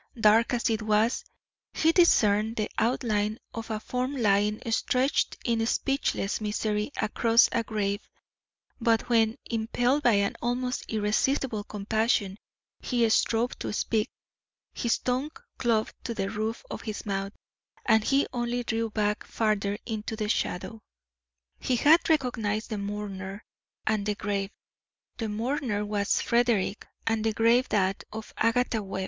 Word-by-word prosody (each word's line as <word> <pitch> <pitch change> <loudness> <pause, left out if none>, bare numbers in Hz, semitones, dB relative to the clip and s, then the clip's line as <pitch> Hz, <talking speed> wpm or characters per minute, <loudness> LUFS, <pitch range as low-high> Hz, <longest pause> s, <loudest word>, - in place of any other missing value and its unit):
Dark 225 +3 +4
as 235 - 0
it 220 0 0
was, 215 +2 +2 0.5
he 320 - +3
discerned 220 - +4
the 215 -2 -2
outline 215 -3 0 0.2
of 230 +1 -6
a 215 -1 -2
form 255 +5 -3
lying 210 -2 +2
stretched 255 +5 +1
in 230 -3 +1
speechless 270 -6 0
misery 210 +2 -1
across 225 +2 +4
a 235 - +1
grave; 205 -2 -2 0.8
but 230 0 +1
when, 225 -1 +3
impelled 245 +5 +1
by 240 -5 +4
an 200 -1 +1
almost 250 +1 -1
irresistible 220 +2 0
compassion, 210 -1 0 0.4
he 240 -3 +1
strove 230 +2 +1
to - - -3
speak, 215 +1 0 0.6
his 235 -3 0
tongue 255 +4 -1 0.3
clove 225 -3 +1
to 235 - -4
the 195 -2 -2
roof 220 +1 -3
of - - -5
his 215 -1 -5
mouth 195 0 -2 0.5
and 220 -2 +4
he 275 +1 +3
only 240 0 -1
drew 225 0 -1
back 210 -1 -1
farther 205 -2 0
into 220 -1 -4
the 215 -1 -2
shadow. 220 +1 -2 0.8
He 255 - 0
had 315 +8 +5
recognised 235 -9 0
the 215 - -2
mourner 200 -1 -5 0.4
and 215 -1 +1
the 210 0 -1
grave. 200 -1 -2 0.7
The 225 -2 -3
mourner 225 -1 -1
was 205 -1 0
Frederick 235 -4 +1 0.2
and 225 -1 0
the 225 -1 +1
grave 230 +3 +3
that 195 -1 +1
of 220 0 -8
Agatha 230 0 +1
Webb. 190 -1 -5
220 Hz, 140 wpm, -27 LUFS, 210-240 Hz, 0.8 s, had